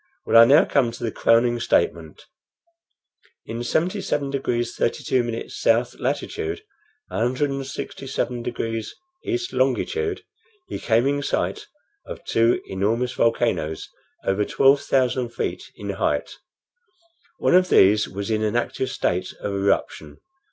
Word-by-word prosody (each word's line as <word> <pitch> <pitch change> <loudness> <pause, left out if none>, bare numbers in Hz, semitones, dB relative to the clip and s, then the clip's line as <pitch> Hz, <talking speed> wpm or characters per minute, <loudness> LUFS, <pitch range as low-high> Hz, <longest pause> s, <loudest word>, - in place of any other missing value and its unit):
Well, - - 0
I - - +9
now 140 +5 +6
come 130 -5 +1
to - - -9
the 115 - -1
crowning 120 +1 +3
statement. 425 - 0 1.2
In 115 +1 -5
77 155 - -1
degrees 120 -3 -2
32' 120 -1 -1
south 115 +2 +1
latitude, 405 - -3 0.5
167 135 0 -2
degrees 115 -2 -4 0.3
east 360 0 -3
longitude, 430 -3 0 0.4
he - - -5
came 115 +1 +2
in 145 +1 +1
sight - - -2 0.4
of - - -8
two 115 +1 +2
enormous 110 +6 -1
volcanoes 115 -9 0 0.4
over 95 +2 +1
twelve 135 +5 +4
thousand 125 -2 0
feet - - -3
in - - -5
height. - - -1 1.1
One - - +1
of 185 0 +5
these 105 +2 +5
was 100 +3 -4
in 110 0 +1
an 110 +1 0
active 130 +2 -1
state 90 +1 -1
of 100 - -3
eruption. 95 -6 -1
120 Hz, 125 wpm, -23 LUFS, 115-140 Hz, 1.2 s, I